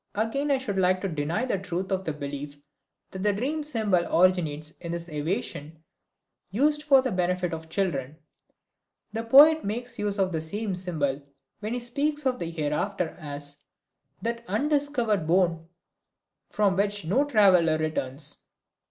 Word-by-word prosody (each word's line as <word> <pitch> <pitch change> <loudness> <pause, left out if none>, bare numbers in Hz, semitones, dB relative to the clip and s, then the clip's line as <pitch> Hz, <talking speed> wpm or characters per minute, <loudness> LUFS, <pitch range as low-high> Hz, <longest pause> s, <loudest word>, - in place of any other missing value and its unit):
Again 225 +7 -1
I 275 - +4
should 205 -7 -3
like 185 0 +3
to 195 - -1
deny 165 +7 -1
the 200 -7 -1
truth 185 0 -4
of 190 0 0
the 160 - -1
belief 145 0 -6 0.5
that 190 - -6
the 210 +1 +3
dream 275 +10 -2
symbol 220 -11 +1
originates 160 -4 +2
in 170 -1 -5
this 170 0 -2
evasion 155 -1 -3 0.7
used 295 +9 +2
for 275 -3 +5
the 260 - -1
benefit 180 -1 0
of 160 0 -7
children. 155 -6 -2 1.0
The 225 - -2
poet 295 +7 +7
makes 235 +4 -4
use 205 -1 -1
of 190 -2 +1
the 160 -2 -2
same 200 +5 -2
symbol 155 -7 -1 0.4
when 215 +3 -3
he - - -2
speaks 285 +5 -2
of 255 -1 +1
the 170 - -3
Hereafter 165 +3 -1
as 145 -2 -4 0.7
"that 235 0 -2
undiscovered 240 - 0
bourne 170 -2 +2 0.8
from 200 -3 +2
which 200 -1 0
no 240 - +3
traveler 190 - +4
returns." 145 -2 -2
190 Hz, 150 wpm, -26 LUFS, 160-230 Hz, 1.0 s, poet